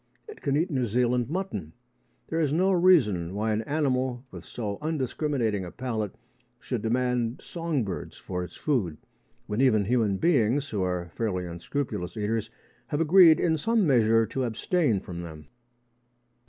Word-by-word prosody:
It 430 - -11
can 140 0 +1
eat 170 +3 0
New 130 -4 0
Zealand 125 +2 +1
mutton. 145 - -4 0.6
There 165 - -1
is 150 -4 +1
no 185 +5 +3
reason 120 - +3
why 110 +2 0
an 105 - 0
animal 130 -2 -1
with - - -10
so 105 -4 -5
undiscriminating 135 -7 -1
a 90 - -6
palate 110 -3 -4 0.4
should - - -3
demand 125 +1 0
song 165 -6 -2
birds 95 -4 -6
for 90 -1 -4
its 90 - -9
food, 105 - -1 0.5
when 105 +4 -1
even 110 -6 +4
human 110 -3 +1
beings, 140 - +2
who 105 -3 -1
are 90 -2 -2
fairly 95 -6 -2
unscrupulous 90 +2 -4
eaters, 110 +1 -1 0.4
have 145 - -2
agreed 165 0 +7
in 160 -2 +2
some 225 +4 +2
measure 115 -5 +4
to 130 +4 -3
abstain 120 - 0
from 85 -1 -7
them. 80 -3 -10
120 Hz, 155 wpm, -27 LUFS, 105-150 Hz, 0.6 s, agreed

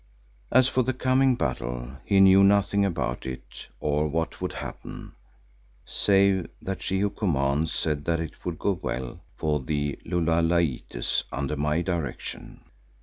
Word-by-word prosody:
As 130 0 +6
for 130 - +1
the 130 +1 -1
coming 130 0 +3
battle, 60 - -3
he 100 -1 +3
knew 95 0 +7
nothing 100 0 +4
about 85 -10 -1
it 65 -1 -8
or 75 +1 +1
what 80 +2 -2
would - - -2
happen, - - -8 0.7
save 100 -2 +3
that 95 0 -5
She 95 0 0
who 100 0 +1
commands 75 -4 0
said 75 -2 -1
that 85 -1 +1
it 80 -2 -6
would 85 -3 -3
go 100 - +1
well 65 +7 -4
for 75 -2 0
the 70 +1 -2
Lulalaites 85 -6 0
under 70 +2 -2
my 75 +3 0
direction. 85 -6 -4
80 Hz, 145 wpm, -26 LUFS, 75-95 Hz, 0.7 s, knew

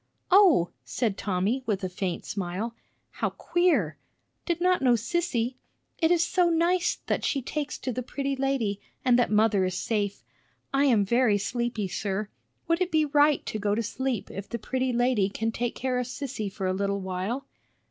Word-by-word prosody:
"O!" 355 - +6
said 225 -6 -1
Tommy, 200 +7 0
with 200 -3 -1
a - - +1
faint 180 -1 -3
smile. 195 +4 -3 0.4
"How - - -1
queer! 270 - +1 0.5
Did 345 -2 0
not 365 +1 +3
know 255 -2 +5
Sissy! 245 -1 -1 0.4
It 325 - +3
is 340 -1 +4
so 360 -2 +3
nice 340 +2 +2
that - - -1
she 275 -3 0
takes 295 +2 -3
to 255 - -3
the 255 - -3
pretty 275 +2 -3
lady, 260 -7 -1 0.2
and 250 -1 +5
that 245 - +2
mother 210 -2 +3
is 185 -1 -1
safe. 205 -2 -1 0.5
I 275 +1 +3
am 225 -7 +4
very 235 0 +3
sleepy, 235 0 -2
sir. 200 +2 -3 0.4
Would 335 +2 +1
it 365 - +1
be 310 -2 +3
right 290 0 +3
to 215 - -3
go 205 0 +1
to 230 - 0
sleep 250 0 -3
if 195 +1 -7
the 235 - -3
pretty 260 +3 -1
lady 240 -5 +2
can 225 +3 -2
take 240 +1 -2
care 255 -1 -1
of 250 - -2
Sissy 245 -5 -4
for 195 -1 -4
a 185 - +1
little 200 +1 -1
while?" 190 +8 -3
240 Hz, 185 wpm, -27 LUFS, 200-275 Hz, 0.5 s, O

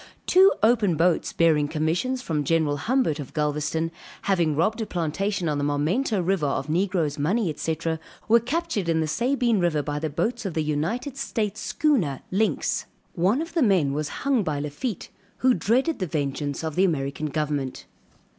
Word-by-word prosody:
Two 380 +2 +6
open 215 -6 +4
boats 170 +1 +2
bearing 155 -3 +3
commissions 170 - -1
from 150 -3 -1
General 155 -1 +1
Humbert, 190 - +1
of 140 - -8
Galvezton, 150 +2 -1 0.3
having 170 -6 +1
robbed 215 +9 +1
a 220 - -3
plantation 180 +3 -1
on 150 -2 0
the - - -1
Marmento 170 - 0
river, 180 -5 +1
of 140 +1 -2
negroes, 165 -3 0
money, 180 +3 +1
&c., 160 +1 -2 0.5
were 230 +2 +6
captured 245 - -2
in 165 -1 +2
the 160 - +1
Sabine 240 - +1
river, 165 -4 +1
by 145 +1 -3
the 155 +1 -2
boats 235 - -1
of 195 -6 -4
the 160 - +1
United 170 - -2
States 215 -7 -2
schooner 215 - +1
Lynx. 210 +4 0 0.3
One 200 - +2
of 330 - -10
the 335 - +1
men 185 - +3
was 150 +1 -2 0.2
hung 275 -4 +3
by 155 -6 -2
Lafitte, 150 - -4 0.3
who 255 0 +4
dreaded 250 - +1
the 185 - -1
vengeance 145 -1 -2
of 160 -1 -2
the 185 - +2
American 150 -4 -1
government. 145 -3 -2
170 Hz, 175 wpm, -25 LUFS, 150-225 Hz, 0.5 s, Two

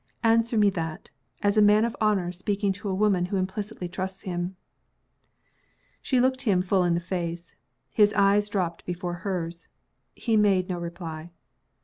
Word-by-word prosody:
Answer 230 0 +3
me 205 -1 +5
that, 165 -4 -5 0.3
as 205 +1 +2
a - - +7
man 210 +2 +5
of 235 - -3
honor 200 -5 +2
speaking 195 +2 -1
to 200 +1 -6
a 190 - -1
woman 195 -3 +2
who 195 +2 -2
implicitly 190 +1 -3
trusts 190 +2 -5
him!" 175 0 -3 1.5
She 255 - +1
looked 260 +1 +2
him 195 -8 +2
full 185 0 +2
in 175 -1 +2
the - - +1
face. 170 -1 -4 0.4
His 210 -1 +5
eyes 205 0 +3
dropped 180 -5 -2
before 175 0 -4
hers 175 -3 -4 0.5
he 225 -3 +1
made 195 -3 +3
no 180 -1 -2
reply. 170 -1 -6
190 Hz, 160 wpm, -26 LUFS, 175-210 Hz, 1.5 s, a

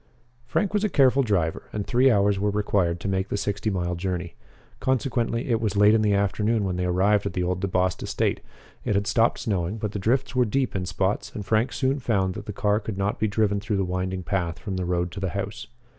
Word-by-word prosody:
Frank 200 +10 0
was 210 0 +1
a 215 - +2
careful 135 -4 +4
driver, 95 -10 -1
and 105 -2 -3
three 130 +2 +4
hours 100 -3 +3
were 105 +1 +1
required 100 -4 0
to 95 - -5
make 95 0 -1
the - - -1
sixty 105 +1 -1
mile 90 -3 -1
journey. 90 -1 -3 0.5
Consequently, 120 -2 0
it 115 -2 +1
was 105 -3 -1
late 105 +1 +6
in 110 - +4
the 105 -1 +3
afternoon 105 +2 +1
when 95 -2 -1
they 90 0 -1
arrived 100 +3 +2
at - - -4
the 90 - -1
old 90 +1 -1
DeBost 90 -2 0
estate. - - -1 0.4
It 105 - 0
had 100 +1 +1
stopped 115 +2 +2
snowing, 95 -1 -1
but 105 -2 -3
the 105 - -4
drifts 130 +7 0
were 125 -1 +4
deep 130 +2 -1
in 90 -2 -2
spots, 95 +3 -1
and 105 - -5
Frank 110 +5 +1
soon 130 +4 0
found 100 -7 0
that 105 0 -8
the - - -3
car 105 +1 +1
could 105 -2 -6
not 100 +1 -1
be 110 - +2
driven 105 -1 +1
through 105 0 -2
the 95 - +1
winding 90 0 -2
path 85 -3 -2
from 100 -3 -5
the 95 -1 -2
road 90 0 -1
to 100 - -6
the 95 -1 -1
house. 100 +1 -5
100 Hz, 235 wpm, -25 LUFS, 95-110 Hz, 0.5 s, late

